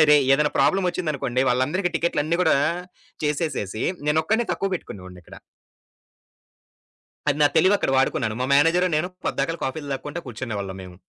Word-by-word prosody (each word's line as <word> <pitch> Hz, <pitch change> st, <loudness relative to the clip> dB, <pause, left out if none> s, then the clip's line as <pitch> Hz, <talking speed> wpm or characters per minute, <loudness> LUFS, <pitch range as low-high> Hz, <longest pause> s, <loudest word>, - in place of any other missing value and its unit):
ఆరేయ్! 150 Hz, -2 st, +6 dB
ఏదైనా 150 Hz, +1 st, +1 dB
ప్రాబ్లమ్ 190 Hz, -1 st, +3 dB
వచ్చిందనుకోండి 140 Hz, -8 st, -2 dB
వాళ్ళందరికి 150 Hz, +10 st, +1 dB
టికెట్లన్ని 165 Hz, -1 st, 0 dB
కూడా 160 Hz, -4 st, +4 dB, 0.7 s
చేసేసేసి 140 Hz, -, -2 dB, 0.2 s
నేనొక్కడినే 215 Hz, +10 st, +1 dB
తక్కువ 195 Hz, -, -2 dB
పెట్టుకునే 100 Hz, -, -7 dB
వాడిని‌క్కడ. 90 Hz, -2 st, -13 dB, 1.9 s
అది 145 Hz, 0 st, +1 dB
నా -, -, +7 dB
తెలివి 185 Hz, +5 st, +5 dB
అక్కడ -, -, 0 dB
వాడుకున్నాను. 110 Hz, -4 st, 0 dB
మా 130 Hz, -, 0 dB
మేనేజరు 165 Hz, +5 st, +4 dB
నేను 165 Hz, +4 st, 0 dB, 0.2 s
పద్దాకళ 165 Hz, 0 st, -1 dB
కాఫీలు 145 Hz, +2 st, -4 dB
తాగుకుంటా 145 Hz, +5 st, -6 dB
కూర్చునే 120 Hz, -1 st, -5 dB
వాళ్ళం 95 Hz, -1 st, -6 dB
మేము. 90 Hz, -1 st, -11 dB
150 Hz, 140 wpm, -23 LUFS, 130-170 Hz, 1.9 s, నా